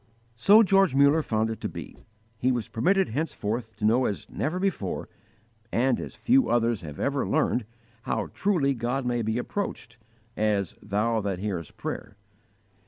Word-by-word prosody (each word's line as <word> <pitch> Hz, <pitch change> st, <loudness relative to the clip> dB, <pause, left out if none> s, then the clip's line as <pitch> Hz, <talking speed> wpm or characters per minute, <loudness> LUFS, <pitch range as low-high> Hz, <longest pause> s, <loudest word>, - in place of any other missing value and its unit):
So 205 Hz, -, +7 dB
George 195 Hz, -7 st, +4 dB
Muller 140 Hz, +3 st, +5 dB
found 110 Hz, -5 st, 0 dB
it 110 Hz, -, -7 dB
to -, -, -2 dB
be. -, -, -8 dB, 0.4 s
He 130 Hz, +2 st, +2 dB
was 120 Hz, -4 st, -1 dB
permitted 190 Hz, -, +2 dB
henceforth 115 Hz, -5 st, -3 dB
to 105 Hz, +1 st, -3 dB
know 120 Hz, +4 st, +4 dB
as 100 Hz, -, -3 dB
never 160 Hz, +5 st, -2 dB
before, 185 Hz, -, -2 dB, 0.6 s
and 125 Hz, +1 st, +2 dB
as -, -, -7 dB
few 260 Hz, +1 st, +3 dB
others 115 Hz, -3 st, +2 dB
have 75 Hz, -3 st, -8 dB
ever 140 Hz, -1 st, 0 dB
learned, 135 Hz, -6 st, +1 dB, 0.4 s
how -, -, -2 dB
truly 170 Hz, -9 st, +1 dB
God 125 Hz, +2 st, -2 dB
may 120 Hz, -1 st, 0 dB
be 110 Hz, +1 st, -1 dB
approached 120 Hz, -, -4 dB, 0.4 s
as 105 Hz, -4 st, 0 dB
"Thou 110 Hz, +2 st, 0 dB
that 100 Hz, -2 st, -2 dB
hearest 90 Hz, -5 st, -4 dB
prayer." 105 Hz, -1 st, -5 dB
120 Hz, 160 wpm, -27 LUFS, 110-140 Hz, 0.6 s, So